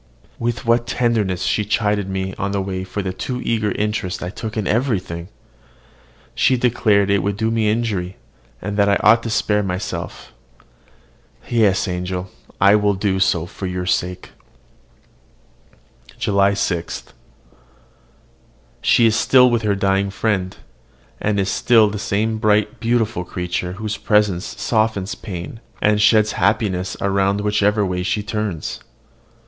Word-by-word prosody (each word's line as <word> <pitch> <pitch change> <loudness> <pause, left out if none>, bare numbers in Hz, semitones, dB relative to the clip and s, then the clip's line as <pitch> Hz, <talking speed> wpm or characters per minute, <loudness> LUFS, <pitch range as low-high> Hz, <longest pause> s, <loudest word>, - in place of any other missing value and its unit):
With 120 +2 -2
what 120 0 +2
tenderness 110 -7 0
she 105 - +1
chid 105 -2 0
me 95 0 -3
on 100 0 -3
the 100 - 0
way 95 -1 -4
for 95 +2 -4
the 95 -1 -3
too 125 +6 -4
eager 110 -3 0
interest 105 -3 -2
I 90 - -4
took 110 +2 -6
in 105 - -1
everything! 95 -8 -1 1.1
She 130 - +2
declared 105 -5 +2
it 100 -1 +3
would 100 +1 -2
do 110 +1 0
me 110 -2 +1
injury, 105 -5 -2 0.5
and 100 +1 -3
that 100 -1 +3
I 100 - +4
ought 115 +1 +5
to 115 - -5
spare 105 -1 +1
myself. 95 0 -5 1.1
Yes, 110 -5 +2
my 90 - -2
angel! 90 +1 -4 0.3
I 100 +2 +6
will 105 -1 +1
do 95 -1 0
so 90 -3 +2
for 95 +2 -6
your 90 0 -3
sake. 90 0 -2 1.9
JULY 100 -1 +2
6. 85 -4 -2 1.8
She 120 - +4
is 110 -1 +3
still 125 +2 +5
with 120 -1 +1
her 105 -2 +1
dying 100 0 +1
friend, 95 -2 -1 0.6
and 105 -1 0
is 95 - 0
still 110 -4 +4
the 105 - -4
same 110 +2 -1
bright, 105 -1 +1
beautiful 115 -5 0
creature 90 0 -4
whose 105 +2 -4
presence 105 -4 0
softens 110 -3 0
pain, 95 +1 -7 0.2
and 105 0 +2
sheds 110 0 +4
happiness 95 -4 0
around 100 +1 +1
whichever 105 0 +2
way 90 -1 -2
she 95 +3 -1
turns. 105 -6 -3
100 Hz, 145 wpm, -20 LUFS, 95-110 Hz, 1.9 s, I